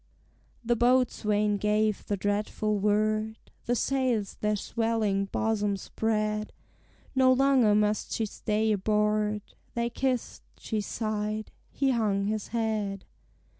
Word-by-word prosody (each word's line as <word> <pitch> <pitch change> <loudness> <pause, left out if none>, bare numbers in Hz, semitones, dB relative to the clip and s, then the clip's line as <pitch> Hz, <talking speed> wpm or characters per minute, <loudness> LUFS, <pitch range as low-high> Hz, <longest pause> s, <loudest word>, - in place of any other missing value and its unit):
The 240 +1 +2
boatswain 215 -4 +2
gave 210 0 0
the 205 - -1
dreadful 210 +1 -1
word, 215 +2 +1 0.3
The 245 - +2
sails 245 -5 0
their 210 0 +1
swelling 215 -2 0
bosom 205 0 0
spread; 215 +1 -2 0.6
No 260 -1 +5
longer 255 -5 +4
must 210 0 +1
she 225 - 0
stay 215 +1 -1
aboard: 210 0 +1 0.3
They 235 0 -1
kissed, 255 -1 -2 0.2
she 220 -2 -3
sighed, 215 0 -3 0.2
he 270 -1 +1
hung 210 -5 +1
his 215 0 -2
head. 215 -4 -2
215 Hz, 115 wpm, -28 LUFS, 210-230 Hz, 0.6 s, No